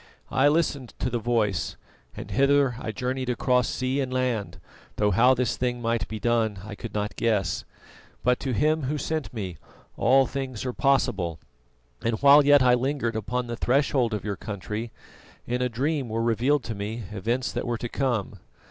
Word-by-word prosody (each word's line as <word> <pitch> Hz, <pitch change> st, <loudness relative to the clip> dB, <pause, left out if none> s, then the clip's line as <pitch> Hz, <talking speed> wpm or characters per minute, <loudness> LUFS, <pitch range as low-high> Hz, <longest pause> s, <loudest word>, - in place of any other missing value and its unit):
I 135 Hz, -, +4 dB
listened 145 Hz, -5 st, 0 dB
to 125 Hz, -, -2 dB
the 120 Hz, -, 0 dB
Voice, 110 Hz, -5 st, 0 dB, 0.4 s
and 105 Hz, -, -7 dB
hither 140 Hz, +2 st, +3 dB
I 110 Hz, -, -4 dB
journeyed 125 Hz, +3 st, -3 dB
across 125 Hz, 0 st, +2 dB
sea 130 Hz, +2 st, -1 dB
and 130 Hz, -1 st, -3 dB
land, 115 Hz, -10 st, -1 dB, 0.4 s
though 105 Hz, -1 st, +2 dB
how 125 Hz, +4 st, +5 dB
this 125 Hz, -2 st, 0 dB
thing 125 Hz, -1 st, -1 dB
might 115 Hz, -2 st, -1 dB
be 110 Hz, -, -6 dB
done 115 Hz, -2 st, +1 dB
I 110 Hz, -, -7 dB
could 115 Hz, +2 st, -8 dB
not 105 Hz, 0 st, -2 dB
guess. 110 Hz, -4 st, 0 dB, 0.6 s
But 125 Hz, 0 st, +2 dB
to 135 Hz, -, -3 dB
Him 150 Hz, +6 st, +1 dB
Who 150 Hz, +3 st, -1 dB
sent 155 Hz, +1 st, -3 dB
me 95 Hz, -, -5 dB, 0.4 s
all 135 Hz, +1 st, +5 dB
things 130 Hz, -3 st, -4 dB
are 125 Hz, -, -2 dB
possible, 115 Hz, -, +1 dB, 0.7 s
and 115 Hz, -1 st, 0 dB
while 140 Hz, +1 st, +8 dB
yet 145 Hz, -1 st, +6 dB
I 125 Hz, -1 st, +5 dB
lingered 125 Hz, -2 st, 0 dB
upon 120 Hz, +4 st, -2 dB
the 120 Hz, 0 st, -4 dB
threshold 125 Hz, -2 st, +1 dB
of 105 Hz, -, -6 dB
your 100 Hz, -1 st, -2 dB
country, 105 Hz, +2 st, -5 dB, 0.5 s
in 125 Hz, +1 st, -2 dB
a 125 Hz, -, +1 dB
dream 135 Hz, +2 st, -1 dB
were 115 Hz, +1 st, -1 dB
revealed 125 Hz, +5 st, +2 dB
to 115 Hz, -, -4 dB
me 105 Hz, +3 st, -5 dB
events 115 Hz, +5 st, -1 dB
that 120 Hz, -, -3 dB
were 120 Hz, -1 st, -1 dB
to 120 Hz, -, -4 dB
come. 115 Hz, -7 st, -2 dB
120 Hz, 185 wpm, -26 LUFS, 110-130 Hz, 0.7 s, while